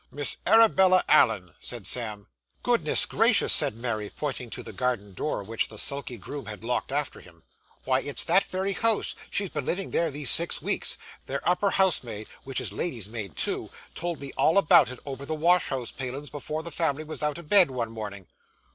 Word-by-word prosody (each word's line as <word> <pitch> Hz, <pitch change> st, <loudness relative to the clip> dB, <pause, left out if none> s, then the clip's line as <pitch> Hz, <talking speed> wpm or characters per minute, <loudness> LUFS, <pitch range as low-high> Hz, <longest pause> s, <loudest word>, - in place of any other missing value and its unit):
'Miss 145 Hz, 0 st, +2 dB
Arabella 190 Hz, -5 st, +5 dB
Allen,' 110 Hz, -11 st, +3 dB
said 120 Hz, -5 st, -8 dB
Sam. 105 Hz, -1 st, -3 dB, 0.4 s
'Goodness -, -, +3 dB
gracious!' -, -, +3 dB
said -, -, +3 dB
Mary, 115 Hz, -3 st, -4 dB
pointing 135 Hz, -5 st, -5 dB
to -, -, -7 dB
the -, -, -10 dB
garden 120 Hz, -6 st, -2 dB
door 105 Hz, +1 st, -3 dB
which 115 Hz, +3 st, -2 dB
the 110 Hz, -, -11 dB
sulky 140 Hz, 0 st, -2 dB
groom 140 Hz, +8 st, -8 dB
had 110 Hz, 0 st, -8 dB
locked 125 Hz, +2 st, -2 dB
after 145 Hz, +1 st, -2 dB
him. 85 Hz, -2 st, -18 dB, 0.4 s
'Why, 130 Hz, 0 st, +1 dB
it's 145 Hz, +1 st, +1 dB
that 180 Hz, +4 st, +3 dB
very 190 Hz, +1 st, -2 dB
house; 225 Hz, +2 st, +1 dB, 0.2 s
she's 200 Hz, -3 st, -1 dB
been 130 Hz, -, -4 dB
living 190 Hz, +5 st, -2 dB
there 170 Hz, -1 st, +1 dB
these 145 Hz, -2 st, +6 dB
six 170 Hz, +1 st, +5 dB
weeks. -, -, 0 dB, 0.3 s
Their 140 Hz, +1 st, -4 dB
upper 180 Hz, +3 st, +2 dB
house 190 Hz, -3 st, +2 dB
maid, 110 Hz, -3 st, -8 dB
which 135 Hz, -1 st, -4 dB
is -, -, -5 dB
lady's 120 Hz, -, -4 dB
maid 105 Hz, -8 st, -7 dB
too, -, -, -2 dB, 0.2 s
told 175 Hz, -2 st, -4 dB
me 140 Hz, -1 st, -8 dB
all 160 Hz, -, +3 dB
about 195 Hz, -9 st, +6 dB
it 130 Hz, -, -8 dB
over 135 Hz, -1 st, -6 dB
the 155 Hz, +3 st, -3 dB
wash 175 Hz, +3 st, +3 dB
house 125 Hz, -3 st, -3 dB
palin's 135 Hz, +2 st, -6 dB
before 150 Hz, +2 st, -5 dB
the 170 Hz, -, -5 dB
family 155 Hz, -1 st, -1 dB
was 155 Hz, 0 st, -4 dB
out 150 Hz, 0 st, -1 dB
of 170 Hz, -3 st, -10 dB
bed, 190 Hz, -3 st, +6 dB
one 120 Hz, -4 st, -4 dB
mornin'. 105 Hz, -4 st, -7 dB
140 Hz, 200 wpm, -26 LUFS, 115-170 Hz, 0.4 s, these